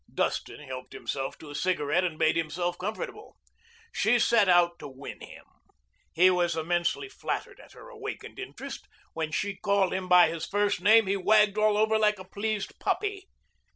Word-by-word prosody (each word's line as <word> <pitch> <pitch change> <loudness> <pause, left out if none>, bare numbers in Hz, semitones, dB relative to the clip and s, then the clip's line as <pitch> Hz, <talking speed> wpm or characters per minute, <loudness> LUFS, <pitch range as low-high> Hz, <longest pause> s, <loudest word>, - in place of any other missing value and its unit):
Dustin - - -2
helped 130 -3 -8
himself 135 -1 -4
to 150 - -11
a - - -8
cigarette 175 +1 0
and 170 -4 -2
made 155 0 +2
himself 175 +2 -1
comfortable. 210 +5 -6 0.5
She 230 +3 +2
set 230 -3 +3
herself 175 -1 +4
to - - -8
win 135 0 -10
him. - - -12 0.7
He 180 +3 +5
was 175 -2 0
immensely 175 - -1
flattered 400 - -5
at - - -16
her - - -13
awakened 440 -4 -8
interest. - - -8 0.3
When 160 -1 -3
she 200 +4 -2
called 200 -2 +1
him 185 -1 -3
by 180 -1 +7
his 165 -1 -5
first 205 -2 0
name, 220 +3 +6
he 195 +1 0
wagged 210 +1 +3
all 215 -1 +3
over 220 +1 +2
like 210 -1 +3
a 185 - -9
pleased 205 +2 -4
puppy. 400 -2 -2
185 Hz, 175 wpm, -28 LUFS, 170-215 Hz, 0.7 s, by